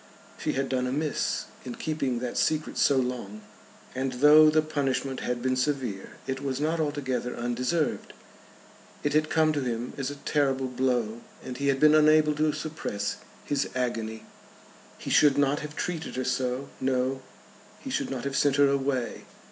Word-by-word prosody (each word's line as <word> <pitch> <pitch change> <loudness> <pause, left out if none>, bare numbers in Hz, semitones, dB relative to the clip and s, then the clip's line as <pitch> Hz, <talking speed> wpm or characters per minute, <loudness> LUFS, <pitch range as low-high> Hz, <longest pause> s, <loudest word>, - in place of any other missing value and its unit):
She - - -1
had 135 0 -1
done 125 -1 0
amiss 145 +4 -1 0.2
in 125 -2 -6
keeping 140 -6 -2
that 125 -1 -3
secret 155 -1 0
so 140 - +4
long, 120 -5 -3 0.5
and 130 0 -2
though 150 +4 +7
the 155 0 +3
punishment 135 -3 -1
had 120 0 -3
been 130 0 +1
severe, 130 -7 -2
it 130 0 -3
was 135 -2 -2
not 160 +3 0
altogether 130 -5 -2
undeserved. 125 +6 -1 0.9
It 145 - 0
had 155 0 +2
come 155 -1 +3
to 145 - -1
him 120 -1 -3
as 135 -1 -1
a 145 - -6
terrible 135 -2 0
blow, 125 -3 -1 0.2
and 125 - -6
he 140 - -1
had 135 -1 +2
been 150 +1 +6
unable 155 0 +5
to 155 0 +2
suppress 150 -10 -4 0.3
his 145 -1 0
agony. 115 -3 -2 0.7
He - - -6
should 145 -2 +5
not 145 0 +2
have 150 0 -7
treated 165 -2 -4
her 130 - -1
so; 130 +1 -1
no, 130 0 0 0.6
he - - -8
should - - -1
not 130 -3 -4
have 140 0 -3
sent 140 -1 +3
her 145 0 +5
away. 135 -3 -1
135 Hz, 170 wpm, -27 LUFS, 125-150 Hz, 0.9 s, though